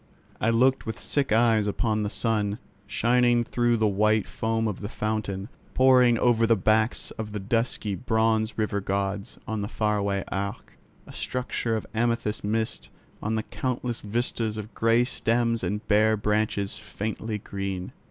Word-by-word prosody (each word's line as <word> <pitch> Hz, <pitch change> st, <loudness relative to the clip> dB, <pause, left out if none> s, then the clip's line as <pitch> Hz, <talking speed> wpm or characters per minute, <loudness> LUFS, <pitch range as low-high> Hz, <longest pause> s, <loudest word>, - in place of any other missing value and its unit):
I 110 Hz, -, +2 dB
looked 130 Hz, +3 st, +3 dB
with 110 Hz, -, -3 dB
sick 140 Hz, -4 st, -1 dB
eyes 110 Hz, -2 st, +4 dB
upon 110 Hz, +1 st, 0 dB
the 105 Hz, -, -1 dB
sun, 105 Hz, -2 st, 0 dB, 0.3 s
shining 120 Hz, 0 st, +3 dB
through 120 Hz, 0 st, +1 dB
the 110 Hz, -1 st, +2 dB
white 105 Hz, +1 st, +2 dB
foam 115 Hz, 0 st, -1 dB
of 105 Hz, -, -3 dB
the 100 Hz, -, -4 dB
fountain, 105 Hz, -3 st, -3 dB, 0.3 s
pouring 125 Hz, -2 st, +6 dB
over 115 Hz, -1 st, +3 dB
the 115 Hz, -, +5 dB
backs 110 Hz, +3 st, +1 dB
of 105 Hz, -1 st, -4 dB
the 105 Hz, -, -2 dB
dusky 110 Hz, 0 st, -1 dB
bronze 110 Hz, +1 st, +1 dB
river 105 Hz, -2 st, 0 dB
gods, 100 Hz, +1 st, -2 dB
on 110 Hz, -2 st, -2 dB
the 100 Hz, -, -2 dB
far 105 Hz, -1 st, 0 dB
away 100 Hz, -1 st, -1 dB
Arc, 100 Hz, 0 st, -5 dB, 0.3 s
a -, -, -12 dB
structure 125 Hz, -2 st, -2 dB
of 110 Hz, -, -3 dB
amethyst 115 Hz, -1 st, 0 dB
mist, 110 Hz, +2 st, -2 dB, 0.3 s
on 110 Hz, +1 st, -1 dB
the 110 Hz, -, -1 dB
countless 125 Hz, -1 st, -3 dB
vistas 110 Hz, 0 st, -1 dB
of 110 Hz, +1 st, -7 dB
grey 115 Hz, +1 st, +3 dB
stems 115 Hz, -2 st, 0 dB
and 105 Hz, +4 st, -3 dB
bare 110 Hz, +1 st, +4 dB
branches 105 Hz, -1 st, 0 dB
faintly 105 Hz, +5 st, -4 dB
green. 100 Hz, -2 st, -5 dB
110 Hz, 160 wpm, -26 LUFS, 105-115 Hz, 0.3 s, pouring